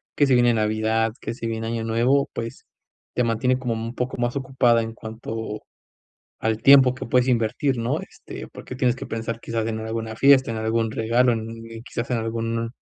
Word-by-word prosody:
que 145 - +4
se 135 - +3
viene 120 -1 +4
Navidad, 110 +1 +1
que - - -4
si 115 -1 -5
viene 115 0 -3
Año 115 0 -2
Nuevo, 120 +5 +2
pues 115 +2 -6 0.5
te 125 - +2
mantiene 115 +2 +1
como 125 -3 -1
un 115 +2 -5
poco 125 +1 -3
más 120 +1 -1
ocupado 130 -3 +2
en 115 0 -3
cuanto 110 -1 -6 0.8
al 110 0 0
tiempo 135 -2 +7
que 130 - -6
puedes 125 +1 +2
invertir, 125 +3 +1
¿no? 115 +1 -1
Este, - - -10
porque 130 - -9
tienes 125 -2 +1
que - - -7
pensar 115 0 -4
quizás 115 -1 -3
en 110 -1 -2
alguna 110 0 -4
fiesta, 135 0 +5
en 115 - -3
algún 110 0 0
regalo, 120 +3 +2
en 115 - -1
un 115 0 -8 0.2
quizás 115 0 -5
en 125 - +2
alguna 115 0 -2
115 Hz, 195 wpm, -23 LUFS, 115-125 Hz, 0.8 s, tiempo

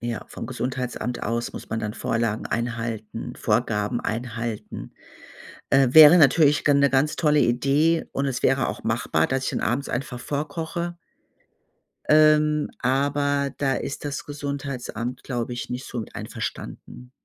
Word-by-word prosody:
Ja, 120 -1 -4
vom - - -7
Gesundheitsamt 125 -1 -4
aus 115 +2 -2
muss - - -9
man 110 - -1
dann 105 0 -4
Vorlagen 115 -2 -1
einhalten, 115 -2 -4
Vorgaben 110 0 0
einhalten. 115 -1 -5 0.8
Äh, 135 -1 +5
wäre 155 +2 +10
natürlich 150 0 +5
gan 145 -1 +4
'ne 140 -1 +4
ganz 135 +3 +1
tolle 150 -2 +3
Idee 140 +7 +2
und 140 - -1
es 130 -2 -3
wäre 135 -1 +2
auch - - -6
machbar, 115 +3 +1
dass 135 0 -1
ich - - -1
dann - - -2
abends 125 +5 -1
einfach 125 0 -4
vorkoche. 160 +5 -4 1.1
Ähm, 150 0 +4
aber 140 +2 +1
da 135 -2 +1
ist 140 - -5
das 145 0 -4
Gesundheitsamt, 140 -4 -5
glaube 120 -1 -3
ich, 120 0 -6
nicht 125 +1 -5
so 120 -3 -4
einverstanden. 125 0 -7
130 Hz, 145 wpm, -24 LUFS, 120-145 Hz, 1.1 s, wäre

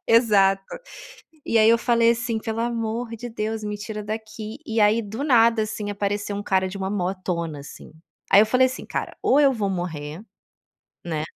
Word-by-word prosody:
Exato. 200 -4 +4 0.8
E 230 - +2
aí 215 0 +6
eu 230 - +6
falei 235 -1 +3
assim: 230 -1 -2
"Pelo 225 0 -4
amor 230 0 -2
de 240 +2 -7
Deus, 220 0 -3
me 210 0 -3
tira 210 0 -6
daqui.". 220 +2 -6
E 225 -4 -2
aí, 210 +2 +4
do 220 +7 -5
nada, 230 -4 +4
assim, 210 -1 -4
apareceu 205 0 -2
um 205 - -4
cara 190 -2 +1
de 195 - -7
uma 190 0 -2
motona, 180 -5 -3
assim. 145 - -12 0.4
Aí 200 - +8
eu - - +2
falei, 255 +3 +4
assim: 255 - -8
"Cara, - - -4
ou 280 - +4
eu 280 -2 +5
vou 210 -5 -1
morrer, 165 -2 -5 0.8
né, 155 -3 -2
215 Hz, 185 wpm, -23 LUFS, 195-230 Hz, 0.8 s, Aí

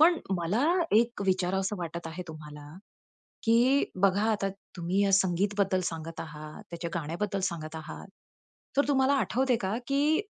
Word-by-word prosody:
पण 330 +1 +6 0.2
मला 190 - 0 0.3
एक 235 -2 +2
विचारावंस 190 +1 +1
वाटत 170 0 -5
आहे 165 +3 -5
तुम्हाला, 150 -2 -9 0.8
की 245 +5 +4 0.2
बघा 195 +1 +4
आता 195 -2 0 0.3
तुम्ही 180 +4 +1
या 195 - +2
संगीत 195 +1 +3
बद्दल 190 -2 +2
सांगत 165 0 -6
आहात, 155 -1 -8
त्याच्या 170 0 -5
गाण्याबद्दल 175 +5 -2
सांगत 160 -2 -6
आहात, 160 +3 -8 0.7
तर 285 0 +3
तुम्हाला 270 0 +4
आठवते 260 -2 +2
का, 195 +2 -1
की 290 +3 +2
190 Hz, 145 wpm, -29 LUFS, 165-230 Hz, 0.8 s, पण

